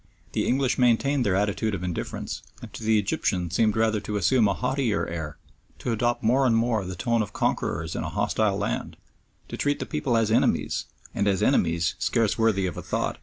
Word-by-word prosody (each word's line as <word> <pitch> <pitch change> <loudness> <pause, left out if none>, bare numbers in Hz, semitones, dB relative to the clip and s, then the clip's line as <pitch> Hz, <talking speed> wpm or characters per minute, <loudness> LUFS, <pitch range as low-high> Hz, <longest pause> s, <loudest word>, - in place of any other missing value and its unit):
The - - -1
English 130 0 +1
maintained 125 +3 +3
their 100 -4 +1
attitude 105 +2 0
of 90 - -6
indifference, 90 -2 -4 0.2
and - - -11
to - - -8
the 110 0 +3
Egyptian 95 -3 -1
seemed 110 +3 +2
rather 110 -1 +2
to 105 0 -3
assume 110 +4 +3
a 100 - 0
haughtier 125 -3 0
air, 80 -4 -5 0.4
to 120 - -3
adopt 120 +2 0
more 130 +4 +3
and 115 - +3
more 115 -2 +1
the 90 0 -5
tone 115 +6 +1
of 105 - -4
conquerors 80 +1 -1
in - - -2
a 80 - -3
hostile 105 +2 0
land, 105 - -3 0.5
to - - -6
treat 145 0 +1
the - - -4
people 135 -6 0
as 110 -1 +1
enemies, 115 - +1 0.3
and 100 - 0
as 95 -2 +1
enemies 85 0 +2
scarce 115 -2 +1
worthy 110 -4 +2
of 90 - -4
a - - -4
thought. - - -2
110 Hz, 205 wpm, -26 LUFS, 95-120 Hz, 0.5 s, maintained